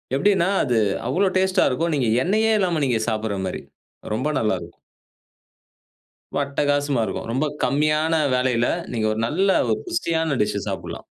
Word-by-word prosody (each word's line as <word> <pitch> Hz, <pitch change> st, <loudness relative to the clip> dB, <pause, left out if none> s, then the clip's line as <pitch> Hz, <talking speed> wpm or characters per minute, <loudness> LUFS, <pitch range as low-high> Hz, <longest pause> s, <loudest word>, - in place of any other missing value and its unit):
எப்டீன்னா 190 Hz, +3 st, +2 dB
அது 125 Hz, -4 st, +1 dB, 0.3 s
அவ்ளோ 195 Hz, +2 st, +2 dB
டேஸ்டா 190 Hz, 0 st, +2 dB
இருக்கும், 165 Hz, +6 st, -1 dB
நீங்க 130 Hz, -5 st, 0 dB, 0.2 s
எண்ணெயே 220 Hz, +5 st, +2 dB
இல்லாம 175 Hz, -5 st, 0 dB
நீங்க 120 Hz, -4 st, +1 dB
சாப்பிடுற 110 Hz, -2 st, -2 dB
மாதிரி. 90 Hz, -, -5 dB, 0.5 s
ரொம்ப 125 Hz, +7 st, -1 dB
நல்லா 110 Hz, -3 st, +1 dB
இருக்கும். 85 Hz, 0 st, -13 dB, 1.5 s
ரொம்ப -, -, 0 dB
அட்டகாசமா 145 Hz, -1 st, 0 dB
இருக்கும். -, -, -4 dB
ரொம்ப 135 Hz, +5 st, 0 dB, 0.2 s
கம்மியான 150 Hz, +4 st, +1 dB, 0.2 s
வேலையில 125 Hz, -2 st, +1 dB, 0.3 s
நீங்க 110 Hz, -3 st, 0 dB
ஒரு 110 Hz, -, -3 dB
நல்ல 185 Hz, +10 st, +1 dB, 0.2 s
ஒரு -, -, +1 dB
புஷ்டியான 165 Hz, -, -1 dB
டிஷ்ஷு 105 Hz, -1 st, -1 dB
சாப்டலாம். -, -, -6 dB
145 Hz, 145 wpm, -22 LUFS, 120-170 Hz, 1.5 s, எப்டீன்னா